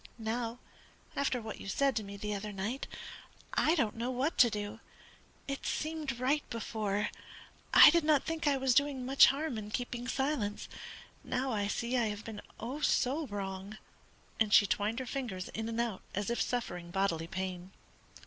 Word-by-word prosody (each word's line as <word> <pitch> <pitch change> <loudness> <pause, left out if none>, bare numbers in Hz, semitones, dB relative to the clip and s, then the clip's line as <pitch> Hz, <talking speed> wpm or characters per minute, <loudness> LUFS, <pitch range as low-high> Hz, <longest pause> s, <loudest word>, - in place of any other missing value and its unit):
Now, 230 +1 -2 0.6
after 270 -3 +1
what 220 -2 -7
you - - -8
said 275 +7 +2
to 220 - 0
me 200 0 -8
the 210 +1 -3
other 205 +1 -4
night, 205 +7 -3 0.7
I 320 - +3
don't 230 -10 +1
know 235 +2 -2
what 255 +5 0
to 240 - +8
do. 210 +1 -4 0.7
It 275 -1 -4
seemed 305 -5 -2
right 275 +4 +2
before. 215 -3 -1 0.6
I - - +10
did 340 0 +3
not 300 -2 +4
think 325 -1 -2
I 280 -1 +4
was 265 -1 +2
doing 280 -1 +2
much 270 +2 +7
harm 275 -4 -1
in 210 -1 -7
keeping 245 +2 -3
silence; 265 -6 -1 0.6
now 260 +1 -1
I 205 -3 0
see 235 +4 -1
I 235 -2 +2
have 210 0 -5
been, 220 -2 -6 0.2
oh, 255 +6 -4
so 285 +2 +2
wrong!" 195 0 -5 0.6
and 220 -1 +3
she 210 - +8
twined 210 +3 0
her 260 - -3
fingers 240 -9 -4
in 225 +1 -4
and 230 0 -3
out 235 -5 -1
as 205 +3 -1
if 235 - 0
suffering 180 -8 -2
bodily 170 -3 0
pain. 185 0 -4
230 Hz, 175 wpm, -32 LUFS, 205-270 Hz, 0.7 s, I